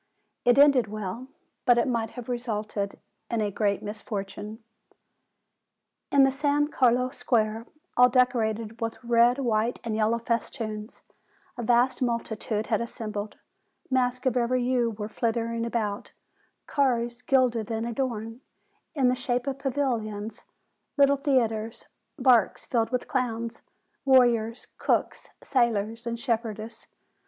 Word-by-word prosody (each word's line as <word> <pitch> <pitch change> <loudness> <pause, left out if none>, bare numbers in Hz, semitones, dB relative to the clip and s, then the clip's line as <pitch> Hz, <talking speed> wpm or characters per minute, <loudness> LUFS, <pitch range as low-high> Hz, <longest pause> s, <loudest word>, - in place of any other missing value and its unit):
It 245 +1 +5
ended 280 -5 +6
well; 215 +4 -5 0.4
but 245 -2 +5
it 235 - +2
might 230 -3 0
have 245 - -7
resulted 215 -5 -3 0.3
in 230 - -1
a 210 -1 0
great 200 0 0
misfortune. 210 +1 -6 1.5
In 280 -1 +6
the 270 - +4
San 290 +1 +1
Carlo 250 -2 +3
Square, 230 -3 0 0.3
all 250 0 +7
decorated 230 -3 +1
with 225 0 -2
red, 235 +1 +4
white, 235 -3 0
and 225 -2 -2
yellow 220 +1 +2
festoons, 225 -1 -4 0.5
a 245 - -5
vast 240 +3 +2
multitude 225 -3 -1
had 220 -1 0
as 235 - -4
sembled; 210 -2 -5 0.6
masks 255 0 +1
of 255 -2 +2
every 250 +1 +1
hue 245 -1 +2
were 210 -1 -5
flitting 230 +1 -1
about; 215 -3 -3 0.5
cars, 240 -4 0
gilded 250 -4 +2
and 225 0 -2
adorned, 235 -1 -3 0.5
in 270 -4 +3
the 250 - +4
shape 245 0 -1
of 275 -1 -3
pavilions; 230 -6 -2 0.5
little 280 0 +5
theatres, 230 -6 0 0.3
barks 250 -4 +3
filled 230 -2 0
with 250 0 -2
clowns, 235 -4 -2 0.4
warriors, 240 -4 +3
cooks, - - 0
sailors, 230 -2 0
and 235 0 -3
shepherdesses. 225 -2 -3
235 Hz, 130 wpm, -27 LUFS, 220-250 Hz, 1.5 s, all